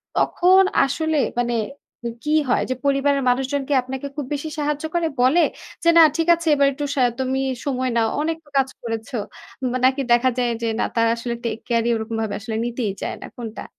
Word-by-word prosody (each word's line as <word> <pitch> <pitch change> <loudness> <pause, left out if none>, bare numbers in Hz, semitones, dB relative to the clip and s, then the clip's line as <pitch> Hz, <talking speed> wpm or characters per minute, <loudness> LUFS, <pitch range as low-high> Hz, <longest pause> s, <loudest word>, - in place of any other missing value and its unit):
তখন 375 +2 +4 0.2
আসলে 315 +3 -1 0.2
মানে 240 -1 0 0.5
উ - - -1
কী 300 +1 0 0.2
হয়? - - +2
যে 255 - 0
পরিবারের 280 0 +2
মানুষজনকে 270 +2 0
আপনাকে 265 +2 -6
খুব 290 - -3
বেশি 290 +2 -3
সাহায্য 295 +1 -1
করে 335 -1 +2
বলে 285 +8 +5 0.4
যে, 335 - +5
"না - - +10 0.2
ঠিক 330 - 0
আছে 335 0 -7
এবার 280 0 +4
একটু 290 +2 -4
সা 265 - +1 0.2
তুমি 265 0 0 0.3
সময় 260 -2 -1
নাও। 225 -1 +2
অনেক 325 +1 -1 0.2
কাজ 270 -1 +2
করেছ।" 225 +1 -5 0.5
উম 250 - 0
নাকি 270 +2 +3
দেখা 240 +2 +5
যায় 245 -1 +1
যে 230 - -1
না - - +2
তারা 230 0 +3
আসলে 235 0 -4
take 225 -1 -3
care 230 -1 +1
ই - - +3
ওরকমভাবে 220 -1 -3
আসলে 220 +1 -5
নিতেই 240 -3 -2
যায় - - -3
না। - - -7
কোনটা? 225 -2 -7
260 Hz, 195 wpm, -22 LUFS, 235-290 Hz, 0.5 s, না